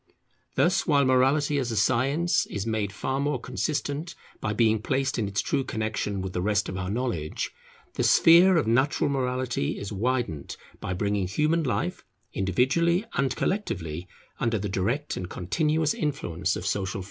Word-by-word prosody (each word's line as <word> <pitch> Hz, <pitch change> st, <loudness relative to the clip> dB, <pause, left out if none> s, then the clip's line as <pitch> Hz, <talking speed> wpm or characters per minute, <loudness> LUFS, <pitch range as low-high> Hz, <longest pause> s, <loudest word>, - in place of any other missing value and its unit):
Thus, 185 Hz, +2 st, +2 dB
while 140 Hz, -3 st, +4 dB
Morality 135 Hz, +3 st, +3 dB
as 125 Hz, -3 st, -2 dB
a 115 Hz, -, -2 dB
science 135 Hz, +10 st, +2 dB
is 100 Hz, 0 st, -4 dB
made 110 Hz, -3 st, -1 dB
far 135 Hz, +6 st, -2 dB
more 140 Hz, -2 st, 0 dB
consistent 145 Hz, +5 st, -3 dB, 0.2 s
by 105 Hz, -, -2 dB
being 110 Hz, 0 st, +2 dB
placed 135 Hz, +1 st, 0 dB
in 105 Hz, -, 0 dB
its 100 Hz, 0 st, -1 dB
true 140 Hz, -2 st, 0 dB
connexion 110 Hz, -4 st, -2 dB
with 95 Hz, -1 st, -5 dB
the 90 Hz, -, -1 dB
rest 100 Hz, +1 st, +1 dB
of 95 Hz, -, -5 dB
our 90 Hz, 0 st, -3 dB
knowledge, 105 Hz, -9 st, -2 dB, 0.4 s
the -, -, -2 dB
sphere 175 Hz, +2 st, +6 dB
of 155 Hz, -, +2 dB
natural 130 Hz, +5 st, +2 dB
morality 125 Hz, -, -1 dB
is 100 Hz, +1 st, -5 dB
widened 110 Hz, -, -2 dB, 0.2 s
by 90 Hz, -, -3 dB
bringing 100 Hz, 0 st, 0 dB
human 150 Hz, -, +1 dB
life, 130 Hz, -6 st, -2 dB, 0.3 s
individually 135 Hz, -, +2 dB
and 135 Hz, -2 st, 0 dB
collectively, 90 Hz, -, -2 dB, 0.3 s
under 115 Hz, -2 st, +1 dB
the 100 Hz, 0 st, -3 dB
direct 115 Hz, +11 st, -1 dB
and 90 Hz, -1 st, -5 dB
continuous 155 Hz, -, 0 dB
influence 95 Hz, -, -2 dB
of -, -, -5 dB
Social 95 Hz, -2 st, -1 dB
Feeling. 100 Hz, -, -4 dB
125 Hz, 165 wpm, -26 LUFS, 100-145 Hz, 0.4 s, sphere